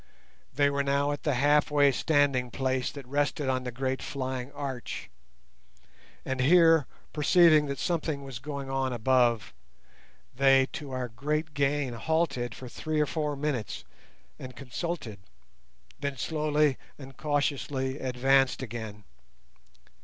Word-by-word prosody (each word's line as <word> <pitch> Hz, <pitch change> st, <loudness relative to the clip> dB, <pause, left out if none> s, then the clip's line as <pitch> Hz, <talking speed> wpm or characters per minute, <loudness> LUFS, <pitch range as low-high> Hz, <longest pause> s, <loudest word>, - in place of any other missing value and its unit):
They 140 Hz, +1 st, +2 dB
were 140 Hz, 0 st, 0 dB
now 140 Hz, +1 st, +1 dB
at 145 Hz, -, -4 dB
the 145 Hz, -4 st, 0 dB
half 145 Hz, +3 st, +3 dB
way 145 Hz, -1 st, +4 dB
standing 140 Hz, -3 st, +2 dB
place 130 Hz, 0 st, -1 dB
that 140 Hz, -3 st, -9 dB
rested 145 Hz, +1 st, -1 dB
on 130 Hz, -1 st, -1 dB
the 125 Hz, -, -3 dB
great 130 Hz, +2 st, -2 dB
flying 130 Hz, -1 st, -4 dB
arch; 135 Hz, -, -6 dB, 1.1 s
and 130 Hz, 0 st, -2 dB
here, 165 Hz, 0 st, +5 dB, 0.3 s
perceiving 155 Hz, 0 st, +5 dB
that 140 Hz, 0 st, -3 dB
something 155 Hz, -5 st, -2 dB
was 135 Hz, -4 st, -7 dB
going 140 Hz, 0 st, -6 dB
on 135 Hz, -1 st, -1 dB
above, 120 Hz, -, +2 dB, 0.8 s
they, 135 Hz, 0 st, +5 dB
to 145 Hz, -, -6 dB
our 130 Hz, -1 st, -3 dB
great 150 Hz, +6 st, -2 dB
gain, 140 Hz, -2 st, 0 dB
halted 135 Hz, -3 st, -1 dB
for 130 Hz, -, -9 dB
three 155 Hz, +5 st, -3 dB
or 150 Hz, -, +3 dB
four 150 Hz, +1 st, -2 dB
minutes 140 Hz, -6 st, -3 dB, 0.6 s
and 130 Hz, -1 st, -9 dB
consulted, 125 Hz, -, -5 dB, 0.8 s
then 140 Hz, -1 st, -3 dB
slowly 150 Hz, -1 st, +1 dB, 0.2 s
and 135 Hz, -2 st, -11 dB
cautiously 140 Hz, -2 st, -1 dB
advanced 135 Hz, +1 st, +2 dB
again. 110 Hz, -3 st, -7 dB
140 Hz, 130 wpm, -28 LUFS, 130-145 Hz, 1.1 s, here